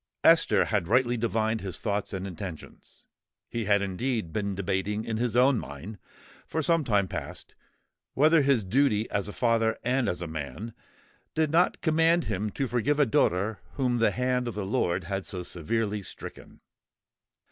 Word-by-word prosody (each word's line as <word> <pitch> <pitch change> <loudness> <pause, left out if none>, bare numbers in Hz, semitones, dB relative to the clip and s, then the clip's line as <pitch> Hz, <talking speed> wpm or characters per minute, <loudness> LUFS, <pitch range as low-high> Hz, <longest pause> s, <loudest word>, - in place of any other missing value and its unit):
Esther - - +5
had 85 - 0
rightly 120 +3 +3
divined 110 -1 0
his 95 -4 -4
thoughts 105 -2 -2
and 95 -1 -4
intentions: 90 -3 -9 0.5
he 115 -2 -2
had 100 -1 +3
indeed 100 -1 -2
been 100 -2 -2
debating 100 +3 -2
in 110 -1 -2
his 120 -1 -1
own 125 0 +4
mind, 85 +9 -8 0.5
for 160 - -2
some 165 +1 +3
time 105 -6 +2
past, - - -7 0.6
whether 155 +3 +5
his 135 -7 +2
duty, 110 0 +2
as 100 0 -1
a - - -5
father 115 -1 +1
and 125 +1 +1
as 90 - -3
a 85 - -4
man, 80 - -6 0.6
did 155 -2 +1
not 170 +3 +2
command 165 +1 +3
him 105 +3 -2
to 135 +6 -2
forgive 125 +4 0
a 145 - +6
daughter 105 -1 +1
whom 125 -3 0
the 115 - +4
hand 125 0 0
of 120 - -4
the 105 -2 -3
Lord 95 -4 0
had 95 +2 -4
so 90 -2 -4
severely 105 +5 -2
stricken. - - -10
110 Hz, 170 wpm, -27 LUFS, 95-125 Hz, 0.6 s, a